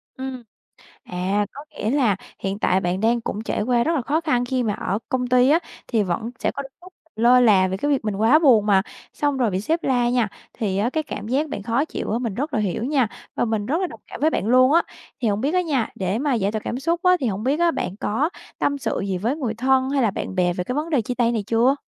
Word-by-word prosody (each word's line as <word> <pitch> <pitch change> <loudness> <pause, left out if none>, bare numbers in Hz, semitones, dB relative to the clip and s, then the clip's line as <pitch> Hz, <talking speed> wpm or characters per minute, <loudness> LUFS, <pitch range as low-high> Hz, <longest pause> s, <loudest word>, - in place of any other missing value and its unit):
Ừm. 260 -2 -6 0.6
À, 190 +3 -1
có 285 +2 -10
nghĩa 215 - -3
là 250 -8 +2 0.2
hiện 195 +1 -3
tại 190 -2 +2
bạn 180 +1 -1
đang 230 +2 +2
cũng 215 -1 -4
trải 215 - -2
qua 240 +1 +2
rất 330 - +1
là 260 - 0
khó 300 +6 0
khăn 250 -7 +1
khi 255 0 -1
mà 210 -3 0
ở 195 +3 -2
công 255 -3 0
ty 250 +1 +4
á, 320 - +5 0.3
thì 225 -4 +2
vẫn 205 +6 -2
sẽ - - 0
có 280 - -4 0.2
lúc 365 0 -14 0.2
lơ 245 +3 +5
là 195 -6 +5
về 190 - -2
cái 290 +8 -1
việc 270 -6 +1
mình 210 -2 -1
quá 225 +9 +5
buồn 245 -10 +5
mà, 195 -2 +4 0.3
xong 290 -2 0
rồi 240 -4 +2
bị 185 0 -1
sếp 325 - -1
la 245 -2 +2
nha. 245 -4 +1 0.2
Thì 195 -3 -2
á 230 +5 +1
cái 315 +2 -1
cảm 210 -7 -7
giác 290 +5 0
bạn 205 -8 -5
khó 235 +7 +1
chịu - - -5
á, 230 - +1
mình 230 -6 -3
rất 290 +6 -3
là 215 - +1
hiểu 210 +2 -1
nha, 265 -5 +2 0.3
và - - +1
mình 220 -3 -1
rất 315 - 0
là 370 - +1
đồng - - -11
cảm - - -9
với 310 +2 +3
bạn 205 - -1
luôn 255 +3 +5
á. 335 +2 +5 0.4
Thì 235 - +1
hông 205 0 0
biết 290 +7 0
á 365 - +4
nha, 275 -9 0
để 190 +3 -1
mà 280 -1 +1
giải 205 -2 0
tỏa 215 - -2
cảm 245 - -3
xúc 335 +5 0
á, 365 0 +5
thì 255 - 0
hổng 210 0 -2
biết 275 +4 +2
bạn 340 0 +2
á 180 - -2
có 265 +9 0 0.3
tâm 285 0 0
sự 275 - -2
gì 190 -2 -1
với 235 +9 -1
người 240 -7 -2
thân 260 +2 +2
hay 275 -2 +1
là 225 - +3
bạn 190 - -5
bè 180 -1 +2
về 180 0 -3
cái 250 - -3
vấn 310 +3 -2
đề 265 -7 +2
chia 245 +3 -3
tay 240 -1 +2
này 220 -3 -1
chưa? 235 +4 +3
240 Hz, 280 wpm, -22 LUFS, 210-280 Hz, 0.6 s, á